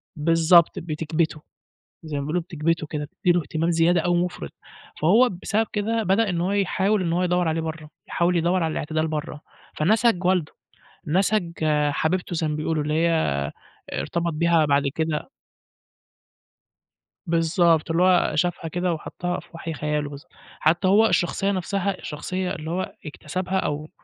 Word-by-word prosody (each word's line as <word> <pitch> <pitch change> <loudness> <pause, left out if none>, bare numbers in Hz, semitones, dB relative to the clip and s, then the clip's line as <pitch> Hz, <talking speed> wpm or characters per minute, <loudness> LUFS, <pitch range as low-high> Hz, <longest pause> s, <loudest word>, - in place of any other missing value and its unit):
بالضبط، 165 +3 +4
بِتكْبِتُه. 160 -1 -2 0.6
زي 155 -2 -5
ما - - -1
بيقولوا 160 +5 -1
بِتكْبِتُه 165 -2 -1
كده، 150 0 -4
بتدّي 175 +4 0
له 175 - +2
اهتمام 160 +3 -1
زيادة 170 +1 +3
أو 175 0 +1
مُفرِط. 175 - -2 0.5
فهو 220 +11 +5
بسبب 220 +1 +1
كده، 225 +2 0
بدأ 200 +2 +2
إن 175 -2 -1
هو 185 +3 0
يحاول 200 0 +1
إنه 170 -1 0
هو 180 - +1
يدّور 180 -1 +1
عليه 160 +1 0
برّه، 160 -1 -6 0.2
يحاول 175 +1 +1
يدوّر 175 +2 +2
على 160 -1 0
الاعتدال 155 +1 -1
برّه. 150 -1 -4 0.4
فنَسَج 210 +2 +2
والده، 180 -4 +1 0.5
نَسَج 185 +2 +1 0.4
حبيبته 175 +4 -1
زي 160 -1 0
ما 150 - -2
بيقولوا، 155 0 -1
اللي 150 +1 -1
هي 170 +2 +2 0.8
ارتبط 170 0 -2
بيها 165 0 +3
بعد 140 -1 +3
كده 160 +6 -2 2.0
بالضبط. 165 -1 +2
اللي 170 +2 +2
هو 185 -1 +4
شافها 170 +1 0
كده 175 +2 -1
وحطّها 175 +2 -4
في - - -16
وَحْي 165 0 -5
خياله 150 0 -2
بالظ 140 0 -10 0.4
حتّى 170 +4 +2
هو 210 +4 +5
الشخصية 195 +1 +1
نفسها 195 0 -1
الشخصية 180 +4 -4
اللي 160 -1 -6
هو 185 +2 -3
اكتسبها 185 +5 -3
أو 150 -1 -3
170 Hz, 155 wpm, -24 LUFS, 155-185 Hz, 2.0 s, فهو